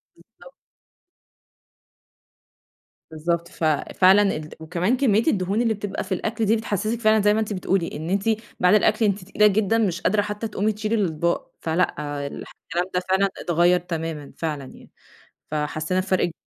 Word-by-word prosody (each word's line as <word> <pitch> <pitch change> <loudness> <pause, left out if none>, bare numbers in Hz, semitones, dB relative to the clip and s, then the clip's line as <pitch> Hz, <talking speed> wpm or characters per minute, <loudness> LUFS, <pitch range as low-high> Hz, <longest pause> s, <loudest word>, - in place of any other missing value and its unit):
بالضبط. - - -18 2.6
بالضبط، 170 +2 -2
ففعلًا 185 +5 +3
الد 155 0 -7
وكمان 180 +9 0
كمية 225 -5 +3
الدهون 200 - +1
اللي 225 -2 +2
بتبقى 205 -1 -4
في 190 - -14
الأكل 220 +4 -2
دي 215 +2 +3
بتحسسِك 220 +1 -2
فعلًا 215 -1 +4
زي 210 +1 +4
ما 215 - +1
أنتِ 215 -1 -2
بتقولي، 185 -2 0
إن 160 +3 -5
أنتِ 195 +1 0 0.4
بعد 180 +3 +4
الأكل 215 +1 +3
أنتِ 200 -2 0
تقيلة 210 +1 +4
جدًا 215 +2 +2
مش 190 -6 0
قادرة 205 +2 +2
حتى 210 +2 -4
تقومي 210 0 0
تشيلي 215 +2 -2
الأطباق، 170 -5 -1
فلأ، 165 +3 +1 0.3
الكلام 175 +4 -5
ده 180 - +2
فعلًا 195 +1 +3
اتغيّر 175 +1 +3
تمامًا 165 -4 -5
فعلًا 150 -4 -3
يعني. - - -15 0.6
فحسينا 155 +4 -1
بفرق 185 0 +1
ك 170 - -10
190 Hz, 155 wpm, -23 LUFS, 170-215 Hz, 2.6 s, فعلًا